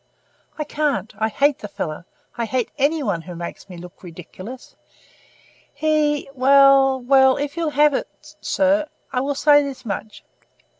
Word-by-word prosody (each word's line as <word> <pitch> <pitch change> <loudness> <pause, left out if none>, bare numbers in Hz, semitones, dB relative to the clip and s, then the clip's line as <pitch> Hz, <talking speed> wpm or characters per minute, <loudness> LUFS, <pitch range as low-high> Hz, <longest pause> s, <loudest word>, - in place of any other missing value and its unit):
"I 305 - -2
can't. 295 -6 -2
I 220 - +1
hate 280 +4 +1
the 210 - -7
fellow. 165 -4 -6 0.3
I 235 - -2
hate 245 +2 -2
any 295 +2 +1
one 200 -8 -1
who 175 +2 -10
makes 170 +3 -8
me 180 - -10
look 175 +1 -12
ridiculous. 185 +7 -11 1.0
He 300 -1 0
well, 275 0 +5
well, 265 +1 +4
if 290 +1 -4
you'll 335 -2 -1
have 295 0 +3
it, - - -2 0.3
sir, 295 +2 +1 0.3
I 250 - 0
will 280 +1 -2
say 290 +1 +5
this 275 -3 -7
much. 215 0 -6
270 Hz, 155 wpm, -21 LUFS, 215-290 Hz, 1.0 s, well